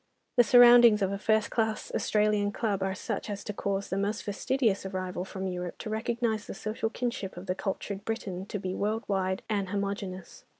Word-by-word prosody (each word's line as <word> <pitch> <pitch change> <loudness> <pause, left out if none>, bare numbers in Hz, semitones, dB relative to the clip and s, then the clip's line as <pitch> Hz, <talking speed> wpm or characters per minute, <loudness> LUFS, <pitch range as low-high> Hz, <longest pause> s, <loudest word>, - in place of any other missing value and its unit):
The 245 - +8
surroundings 240 -3 +8
of 195 - +1
a 200 - -3
first 220 0 +2
class 220 -2 -1
Australian 210 -1 +2
Club 205 -3 -1
are 190 0 -1
such 210 +2 -4
as 205 -1 -4
to 210 - -4
cause 200 0 -2
the 190 - -1
most 205 +2 -1
fastidious 215 +1 0
arrival 185 -2 -3
from 190 0 -5
Europe 180 -1 -4
to 215 - -6
recognise 220 0 -1
the - - -6
social 220 +1 -3
kinship 235 -7 -4
of 180 - -7
the 185 - 0
cultured 195 +1 -4
Briton 195 -4 -4
to 205 - -3
be 185 -1 -4
worldwide 200 -3 -1
and 200 -3 -1
homogeneous. 200 -2 -4
205 Hz, 185 wpm, -29 LUFS, 190-220 Hz, -, The